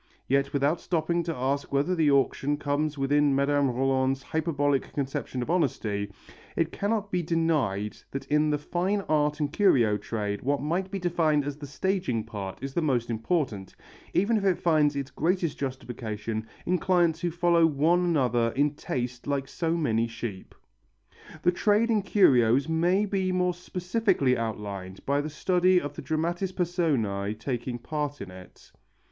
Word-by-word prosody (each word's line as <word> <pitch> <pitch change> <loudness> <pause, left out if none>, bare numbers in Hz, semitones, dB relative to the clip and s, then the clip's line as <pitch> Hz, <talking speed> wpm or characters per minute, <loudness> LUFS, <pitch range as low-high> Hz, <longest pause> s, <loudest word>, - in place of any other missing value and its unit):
Yet 140 +1 +1
without 145 +4 +1
stopping 170 0 0
to 165 -1 -2
ask 135 +3 -2
whether 140 +6 +1
the 160 -4 +3
action 140 +1 +2
comes 145 +1 -1
within 140 +1 +2
Mme. 140 0 +2
Rolland's 130 +1 +1
hyperbolic 145 -4 0
conception 135 -2 -3
of 120 - -3
honesty, 110 - -1 0.4
it 165 0 0
cannot 205 0 -1
be 180 - +1
denied 150 - 0
that 135 - -5
in 150 +1 +2
the 150 - +1
fine 180 +7 -1
art 150 -3 +1
and 145 0 -1
curio 120 - +4
trade 105 -2 -3
what 140 +2 0
might 170 +6 -1
be 195 - -3
defined 165 -5 +1
as 145 -1 -3
the 145 -1 -8
staging 145 - -1
part 100 -4 -6
is 135 0 -4
the 170 - 0
most 125 -6 0
important, 115 - -2 0.4
even 220 +5 +2
if 205 - -2
it 190 -3 +2
finds 150 -3 +2
its 140 -1 -4
greatest 170 0 0
justification 115 -5 -4 0.2
in 180 0 +1
clients 175 -3 +2
who 175 - 0
follow 170 0 +3
one 160 +4 +2
another 125 -9 +2
in 145 +2 +2
taste 125 -3 -4
like 140 -1 -1
so 165 +3 -1
many 115 -7 +1
sheep. 115 -4 -7 0.9
The 180 - +5
trade 210 +5 +2
in 215 -2 +3
curios 135 - +4
may 175 +5 +2
be 190 -2 -1
more 180 0 +1
specifically 180 - 0
outlined 100 -5 -5
by 140 +1 +1
the 150 - -4
study 180 +4 +3
of 145 -3 -5
the - - -6
dramatis 170 +6 -1
personæ 135 - -1
taking 120 +1 -3
part 145 +3 -4
in 95 - -7
it. 90 0 -14
145 Hz, 165 wpm, -27 LUFS, 125-175 Hz, 0.9 s, The